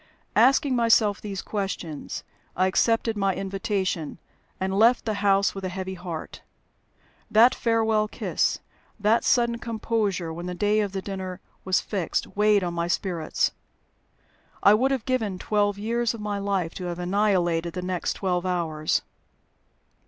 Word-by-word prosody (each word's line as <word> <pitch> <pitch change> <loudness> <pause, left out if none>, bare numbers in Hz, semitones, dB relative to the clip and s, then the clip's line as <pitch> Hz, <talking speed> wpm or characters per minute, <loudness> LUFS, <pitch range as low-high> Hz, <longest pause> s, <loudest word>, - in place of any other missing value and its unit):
Asking 265 +4 +4
myself 225 -4 +3
these 200 -2 -5
questions, 190 -7 -4 0.3
I 185 - +2
accepted 225 +4 +2
my 195 -2 +1
invitation, 195 -4 -2 0.4
and 190 0 -1
left 230 +5 +4
the 220 - 0
house 200 -1 +3
with 195 - -7
a 185 - -2
heavy 190 +1 -5
heart. 175 -3 -7 0.9
That 230 +4 +6
farewell 225 -3 +1
kiss, - - -1 0.4
that 215 +3 +3
sudden 235 -3 +2
composure 215 -7 -2
when 175 +2 -6
the 180 - -4
day 210 +3 +2
of 205 -2 -1
the 190 -1 -3
dinner 190 -2 -5 0.2
was 185 0 +2
fixed, 190 -6 -3
weighed 210 -1 +4
on 175 -1 -2
my 170 0 -1
spirits. 175 -3 0 1.1
I 200 - +8
would 250 +5 +3
have 265 -4 -1
given 225 -7 -1
twelve 205 0 0
years 230 +2 -1
of - - -9
my 210 -1 -3
life 195 -4 -1
to - - -4
have 175 -1 -4
annihilated 175 -3 +1
the 180 - -4
next 180 -1 -1
twelve 180 -2 -1
hours. 165 -4 0
200 Hz, 150 wpm, -25 LUFS, 180-220 Hz, 1.1 s, I